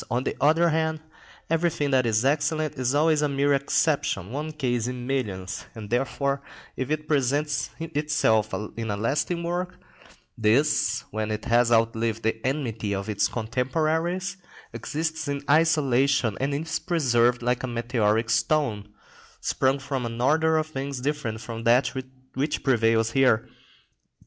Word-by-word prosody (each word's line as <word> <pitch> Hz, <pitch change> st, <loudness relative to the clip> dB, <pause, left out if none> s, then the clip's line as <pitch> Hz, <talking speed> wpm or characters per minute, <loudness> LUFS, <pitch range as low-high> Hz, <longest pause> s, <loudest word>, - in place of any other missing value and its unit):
On 125 Hz, +1 st, 0 dB
the -, -, -2 dB
other 160 Hz, +4 st, +4 dB
hand, 160 Hz, 0 st, 0 dB, 0.5 s
everything 165 Hz, -3 st, 0 dB
that 130 Hz, -2 st, +3 dB
is 110 Hz, +2 st, +1 dB
excellent 155 Hz, +2 st, +1 dB
is 130 Hz, +1 st, -1 dB
always 155 Hz, 0 st, +3 dB
a 150 Hz, -, +1 dB
mere 140 Hz, +1 st, +2 dB
exception, 140 Hz, -, 0 dB
one 150 Hz, +4 st, -4 dB
case 125 Hz, -6 st, -1 dB
in 125 Hz, -1 st, -5 dB
millions, 95 Hz, -8 st, -3 dB
and 110 Hz, -2 st, -8 dB
therefore, 140 Hz, +3 st, 0 dB, 0.3 s
if 130 Hz, +1 st, -3 dB
it 155 Hz, 0 st, -2 dB
presents 145 Hz, +1 st, 0 dB
itself 150 Hz, -9 st, +1 dB, 0.3 s
in 115 Hz, -1 st, -3 dB
a 100 Hz, -, -1 dB
lasting 150 Hz, -, -1 dB
work, 180 Hz, +2 st, -3 dB, 0.6 s
this, 115 Hz, +8 st, +2 dB
when 110 Hz, 0 st, -2 dB
it 105 Hz, 0 st, -3 dB
has 120 Hz, 0 st, +3 dB
outlived 115 Hz, 0 st, +1 dB
the 110 Hz, 0 st, -1 dB
enmity 115 Hz, -7 st, -2 dB
of 100 Hz, +2 st, -4 dB
its 100 Hz, -1 st, +1 dB
contemporaries, 160 Hz, -, -1 dB, 0.4 s
exists 160 Hz, +6 st, -3 dB
in 140 Hz, 0 st, -3 dB
isolation, 140 Hz, -6 st, +3 dB
is 145 Hz, +4 st, -1 dB
preserved 125 Hz, -8 st, +2 dB
like 125 Hz, 0 st, +1 dB
a 130 Hz, -, -3 dB
meteoric 115 Hz, -2 st, 0 dB
stone, 115 Hz, -3 st, +1 dB, 0.5 s
sprung 135 Hz, +1 st, +1 dB
from 135 Hz, -3 st, -3 dB
an 115 Hz, 0 st, -6 dB
order 160 Hz, +5 st, +3 dB
of 155 Hz, -, +1 dB
things 140 Hz, -3 st, -5 dB
different 135 Hz, -5 st, -2 dB
from 115 Hz, -1 st, -6 dB
that 120 Hz, +3 st, +4 dB, 0.4 s
which 145 Hz, +3 st, -2 dB
prevails 115 Hz, -3 st, +2 dB
here. 125 Hz, -4 st, +3 dB
135 Hz, 145 wpm, -25 LUFS, 115-150 Hz, 0.6 s, other